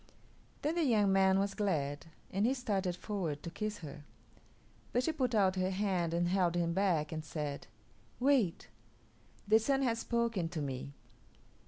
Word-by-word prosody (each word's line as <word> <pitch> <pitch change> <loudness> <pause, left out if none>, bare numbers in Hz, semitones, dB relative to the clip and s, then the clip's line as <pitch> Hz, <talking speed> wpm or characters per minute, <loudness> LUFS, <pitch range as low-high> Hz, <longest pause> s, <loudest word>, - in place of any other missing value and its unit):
Then 300 +2 +1
the 340 -1 +1
young 210 -8 +3
man 190 0 +4
was 200 0 0
glad, 145 -8 -1 0.2
and 195 +2 0
he 260 - +2
started 200 -8 -1
forward 175 -7 -3
to 170 - -5
kiss 215 +3 -3
her, 145 0 -9 0.9
but 245 - +1
she 320 - +1
put 255 -6 0
out 190 -3 +3
her 185 0 +1
hand 185 -3 0
and 170 +1 +1
held 180 -2 +2
him 170 -1 +1
back, 170 -6 +1
and 155 -1 -4
said, 150 -2 -4 0.5
"Wait; 250 -9 +2 0.8
the 220 +2 +6
Sun 270 +4 +1
has 230 -3 +1
spoken 230 -8 0
to 165 -1 -4
me. 140 -1 -4
190 Hz, 165 wpm, -33 LUFS, 170-225 Hz, 0.9 s, the